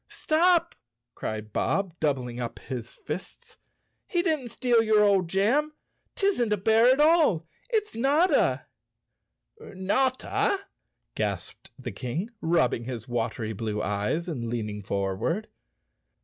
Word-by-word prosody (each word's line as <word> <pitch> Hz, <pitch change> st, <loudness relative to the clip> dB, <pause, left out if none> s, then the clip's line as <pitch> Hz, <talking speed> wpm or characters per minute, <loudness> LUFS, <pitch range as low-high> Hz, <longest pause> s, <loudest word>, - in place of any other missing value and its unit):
" -, -, -53 dB, 0.2 s
Stop! 340 Hz, +2 st, +4 dB, 0.2 s
" 120 Hz, 0 st, -59 dB
cried 110 Hz, -1 st, -5 dB
Bob, 195 Hz, -3 st, 0 dB
doubling 130 Hz, -5 st, -1 dB
up 120 Hz, -2 st, -4 dB
his 120 Hz, -3 st, -7 dB
fists. 165 Hz, +5 st, -8 dB, 0.3 s
" -, -, -48 dB
He 345 Hz, -2 st, +1 dB
didn't 310 Hz, -8 st, 0 dB
steal 240 Hz, -1 st, +2 dB
your 215 Hz, -1 st, +4 dB
old 195 Hz, -3 st, +3 dB
jam. 245 Hz, -, +2 dB, 0.4 s
'Tisn't 375 Hz, -, +1 dB
a 210 Hz, -, +3 dB
bear 220 Hz, +4 st, +4 dB
at 260 Hz, +2 st, +5 dB
all, 300 Hz, -, +4 dB, 0.2 s
it's 435 Hz, -3 st, 0 dB
Notta!" 285 Hz, +10 st, +2 dB, 0.9 s
"Notta?" 255 Hz, -, 0 dB, 0.6 s
gasped -, -, -4 dB
the -, -, -6 dB
King, 160 Hz, -, -4 dB
rubbing 160 Hz, -8 st, +1 dB
his 120 Hz, -3 st, -6 dB
watery 115 Hz, -2 st, -2 dB
blue 105 Hz, 0 st, -3 dB
eyes, 105 Hz, -, -1 dB
and 125 Hz, -9 st, -3 dB
leaning 105 Hz, -3 st, -3 dB
forward. 100 Hz, -, -2 dB
185 Hz, 130 wpm, -27 LUFS, -, 0.9 s, at